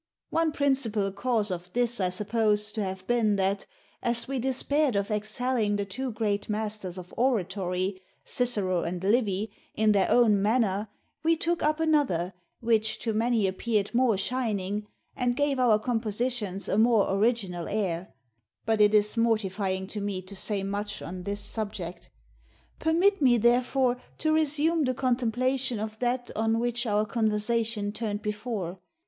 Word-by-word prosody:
One 325 -1 +2
principal 260 -9 +1
cause 215 -1 0
of 180 0 -5
this 240 -1 +1
I 185 - +2
suppose 210 +2 0
to 215 -1 -2
have 190 -1 -5
been 225 -3 +2
that, 195 0 0 0.3
as 235 0 0
we 270 -1 -2
despaired 265 +1 +1
of 200 +1 0
excelling 215 +1 0
the 200 0 -1
two 250 +7 -4
great 210 -2 -1
masters 210 -3 -3
of 180 -1 -9
oratory, 190 -5 0 0.2
Cicero 205 -8 0
and 175 +1 -4
Livy, 210 -1 +1 0.2
in 220 0 +3
their 200 -2 +3
own 220 -5 +4
manner, 210 -1 +1 0.3
we 330 +1 +2
took 340 +1 0
up 305 +1 +1
another, 280 - +1 0.3
which 220 -1 +1
to 225 - -1
many 225 -1 +2
appeared 205 +2 -1
more 240 -4 +3
shining, 210 -3 -2 0.3
and 245 -1 0
gave 285 -2 +1
our 235 -4 +5
compositions 220 -3 -2
a 200 - +1
more 225 -4 +4
original 195 -5 0
air; 190 -4 -2 0.5
but 220 -1 +2
it 210 +1 +5
is 210 +1 +3
mortifying 200 -4 0
to 205 +2 -5
me 200 -2 -2
to 195 +2 -9
say 200 0 -1
much 205 +1 -4
on 180 +2 -6
this 200 +2 -4
subject. 185 -6 -6 0.7
Permit 355 +5 +3
me, 250 -3 +5
therefore, 245 +2 +2 0.2
to 310 0 +1
resume 310 +1 +3
the 255 0 0
contemplation 255 0 0
of 215 +1 -5
that 245 0 -1
on 225 +1 +1
which 240 +1 -1
our 210 0 +2
conversation 215 0 0
turned 210 -1 -4
before. 210 -4 -3
220 Hz, 155 wpm, -27 LUFS, 200-245 Hz, 0.7 s, our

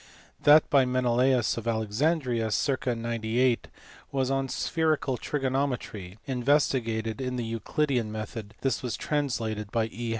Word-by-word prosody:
That 150 +1 +7
by 140 -2 +6
Menelaus 125 -1 +2
of 115 - -8
Alexandria, 115 +2 0
circ. 130 +5 0
98, 115 +1 0 0.4
was 135 -1 0
on 135 -1 0
spherical 155 -1 0
trigonometry, 130 -9 -2
investigated 125 -4 +1
in 125 -1 -2
the 120 -2 -2
Euclidean 115 +1 -1
method; 110 -1 -6
this 135 -3 0
was 125 -4 -3
translated 115 -8 -2
by 115 -2 +1
E. 120 +1 -4
125 Hz, 125 wpm, -28 LUFS, 115-135 Hz, 0.4 s, That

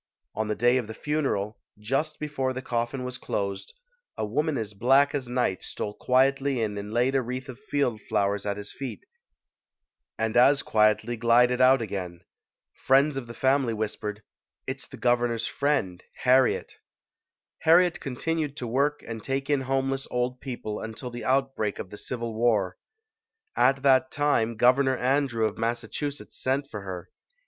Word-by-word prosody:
On 110 0 -2
the 105 - -1
day 120 +2 +3
of 120 -4 -2
the 110 - -7
funeral, 135 -10 -1 0.2
just 135 +9 -1
before 140 -4 -2
the 130 - -4
coffin 120 +2 -2
was 125 0 -5
closed, 100 - -4 0.4
a - - -1
woman 150 +7 0
as 110 -2 -4
black 135 +7 +4
as 135 -4 -3
night 120 -6 0
stole 105 - -4
quietly 135 +2 +2
in 105 -2 -1
and 105 +1 -7
laid 120 +4 +2
a 135 - +3
wreath 130 +2 -5
of 130 -1 -9
field 140 -6 -1
flowers 100 0 +1
at 100 -1 -2
his 100 0 -7
feet 135 - -7 1.1
and 110 0 -1
as 135 +3 +5
quietly 110 +2 +2
glided 120 +2 +4
out 130 -1 +6
again. 90 -4 -5 0.5
Friends 135 +2 +3
of 135 -3 -4
the 120 - -9
family 130 -2 +2
whispered, 105 0 -4 0.4
"It's - - -5
the - - -11
Governor's 120 -2 +1
friend, 115 -9 -1 0.2
Harriet". 130 0 +3 0.8
Harriet 175 +2 +4
continued 150 +2 -3
to 125 - -4
work 140 +5 0
and 110 -2 -6
take 135 +1 -2
in 140 -2 +2
homeless 135 +1 -1
old 125 +1 -2
people 120 -5 -5
until 110 +3 -6
the 120 0 -6
outbreak 135 -6 0
of 90 - -7
the 105 - -8
Civil 115 -1 -4
War. 110 -5 +1 0.8
At 135 0 +3
that 130 -1 +4
time, 125 -7 +1
Governor 130 +2 +4
Andrew 130 -3 +1
of 110 - -2
Massachu 120 +5 -2
setts 140 - -10
sent 135 +2 0
for 105 - -5
her. 95 -3 -7
125 Hz, 165 wpm, -27 LUFS, 110-135 Hz, 1.1 s, out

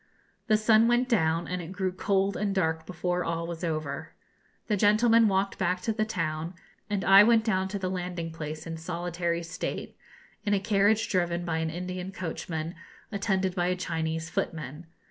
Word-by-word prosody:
The 215 -2 +5
sun 220 +1 +5
went 240 +1 +3
down, 165 -8 +2
and 180 0 -3
it 170 +1 -8
grew 190 -1 -1
cold 195 +1 +1
and 200 -1 -1
dark 160 -3 0
before 180 0 -1
all 165 0 -2
was 170 0 -6
over. 155 -4 -3 0.5
The 215 - +1
gentlemen 220 +3 +5
walked 195 0 0
back 180 -1 +1
to 225 +4 0
the 215 0 0
town, 165 -4 -3 0.3
and 205 -2 -1
I 195 +1 +9
went 225 0 +5
down 190 -4 +1
to 200 +1 -3
the 190 -1 -2
landing 180 -2 -3
place 155 -1 -6
in 165 -1 -5
solitary 170 0 -2
state, 170 +2 -5 0.5
in 205 -1 +2
a - - +2
carriage 205 +2 +3
driven 175 -2 0
by 160 -2 -1
an 160 0 -1
Indian 180 +2 -5
coachman, 165 -3 -4 0.4
attended 195 -2 0
by 175 -1 0
a 180 - +1
Chinese 160 -2 -2
footman. 155 0 -4
180 Hz, 180 wpm, -28 LUFS, 165-200 Hz, 0.5 s, I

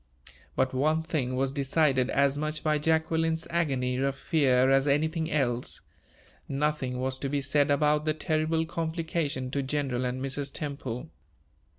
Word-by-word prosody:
But 130 0 +1
one 155 +5 +2
thing 140 -6 -1
was 135 +1 0
decided 135 -2 +2
as 140 0 +3
much 155 +1 -3
by 155 -1 +2
Jacqueline's 160 +1 +1
agony 135 -7 0
of 135 +1 0
fear 135 -3 +3
as 135 +1 +4
anything 160 +3 +1
else: 125 -5 -1 0.7
nothing 140 -2 -1
was 130 +1 -2
to 140 - -2
be 145 +1 0
said 140 +1 +2
about 150 +1 +2
the 155 -1 +1
terrible 160 0 0
complication 160 -5 -2
to 140 - 0
General 135 -2 -1
and 125 +1 -2
Mrs. 135 +1 -2
Temple. 140 -1 -5
145 Hz, 150 wpm, -28 LUFS, 130-155 Hz, 0.7 s, as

